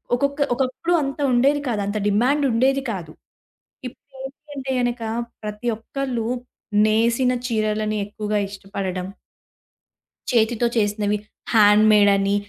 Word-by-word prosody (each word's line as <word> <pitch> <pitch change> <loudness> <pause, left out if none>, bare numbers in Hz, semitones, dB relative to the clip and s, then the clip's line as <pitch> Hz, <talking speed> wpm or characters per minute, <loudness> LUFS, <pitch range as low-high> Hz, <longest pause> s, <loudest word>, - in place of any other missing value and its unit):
ఒకొక్క 280 +3 -1 0.2
ఒకప్పుడు 265 +7 -1
అంత 275 +1 -4
ఉండేది 280 +4 +3
కాదు. 230 -4 -1
అంత 210 +1 -2
డిమాండ్ 250 +8 +2
ఉండేది 265 +4 +2
కాదు. 170 -7 -6 0.8
ఇప్పుడేంటి 270 +3 -12
అంటే 270 -1 -4
గనక 245 -1 -1 0.4
ప్రతి 210 +2 -5
ఒక్కళ్ళు 240 -1 -3 0.6
నేసిన 235 +4 +2
చీరలని 215 -1 -1
ఎక్కువగా 210 0 -3
ఇష్టపడడం 190 -2 -5 1.2
చేతితో 235 0 +2
చేసినవి 210 -1 +1 0.4
హాండ్ 210 -1 +6
మేడ్ 205 -1 +6
అని 195 +1 +1
225 Hz, 110 wpm, -22 LUFS, 210-265 Hz, 1.2 s, హాండ్